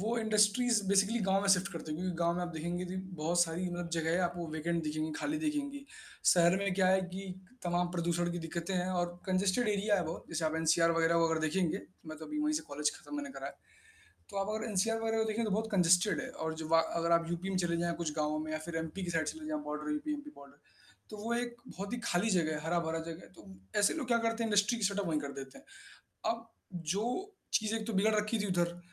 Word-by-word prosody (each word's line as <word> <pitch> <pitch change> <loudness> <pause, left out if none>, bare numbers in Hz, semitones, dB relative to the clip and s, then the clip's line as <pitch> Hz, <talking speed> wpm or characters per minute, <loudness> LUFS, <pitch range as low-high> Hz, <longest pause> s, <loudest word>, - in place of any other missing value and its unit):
वो 225 +4 0
industries 220 +1 +3
basically 200 +4 +4
गाँव 195 0 +3
में 200 - 0
शिफ्ट 180 0 -1
कर 165 - -4
देंगे। 155 +1 -5
क्योंकि 180 -1 -2
गाँव 170 0 +2
में 180 - -1
आप 175 - -2
देखेंगे 175 +3 -3
जी, 180 +1 -5
बहुत 175 -2 -1
सारी 175 +2 -1
मतलब 175 0 -4
जगहें 165 +1 +1
आप 175 - -6
वो 170 -1 -3
वेकेंट 165 +2 -1
देखेंगे, 155 +1 -1
खाली 305 +1 -1
देखेंगी। 290 -2 -2 0.4
शहर 175 +1 +6
में 200 -1 0
क्या 185 -1 +3
है 190 +1 +5
कि 190 0 -5 0.3
तमाम 175 0 +1
प्रदूषण 175 0 +1
की 175 - -3
दिक्कतें 170 +3 -3
हैं 180 0 0
और 175 0 -1
कन्जेस्टेड 190 +5 +2
एरिया 205 0 +2
है 180 - 0
बहुत, 160 +1 -5
जैसे 165 -1 -2
आप 155 0 +1
एनसीआर 165 +1 +4
वग़ैरह 165 0 +3
वो 165 0 +4
अगर 160 -1 +1
देखेंगे, 170 +4 0 0.2
मैं 155 -1 -7
तो 160 - -8
अभी 300 - -4
वहीं 305 0 +2
से 305 - 0
कॉलेज 150 +1 0
खत्म 295 - -8
मैंने 285 -1 -4
करा - - -5
है। - - -7 0.8
तो 200 - -7
आप 195 0 0
अगर 220 +2 -3
एनसीआर 225 +2 +1
वग़ैरह 225 0 0
को 220 - +3
देखें, 225 +2 0
तो 215 - -1
बहुत 220 +3 0
कंजस्टेड 180 +1 +4
है - - -5
और 160 0 -3
जो 160 -1 -6
वा 165 0 +6 0.2
अगर 170 0 +1
आप 170 0 +3
यूपी 175 +3 -2
में 190 - -1
चले 170 0 +1
जाएँ 170 0 0
कुछ 155 -3 -1
गाँव 150 0 0
में 155 - -5
या 155 - -1
फिर 170 -1 -4
एमपी 165 +4 -3
की 175 - -3
साइड 165 -2 0
चले 320 -1 -5
जाएँ 310 0 -2
बॉर्डर 150 - -3
यूपी 300 0 -2
एमपी 295 0 -5
बॉर्डर 140 0 -14 0.5
तो 215 - -7
वो 225 +3 -2
एक 240 0 -2
बहुत 200 +4 -6
ही 245 - -1
खाली 195 +6 +2
जगह 170 -5 +2
है, 150 - -3
हरा-भरा 165 -1 0
जगह 165 +1 -6
है। - - -13
तो 175 - -15 0.3
ऐसे 205 - +4
लोग 300 -6 -3
क्या 235 - +4
करते 230 0 0
हैं, 225 - -1
इंडस्ट्री 205 +3 +3
की 220 - -1
सेटअप 200 0 +1
वही 155 -2 +1
कर 140 -1 -5
देते 135 -1 -8 0.5
हैं। - - -3
अब 230 0 -6 0.5
जो 250 - -2 0.2
चीज़ें 220 0 +2
एक 215 - -5
तो 230 - -2
बिगड़ 210 +3 +3
रखी 215 +2 +1
थी 205 - 0
उधर, 175 -1 0
180 Hz, 255 wpm, -33 LUFS, 165-215 Hz, 0.8 s, शहर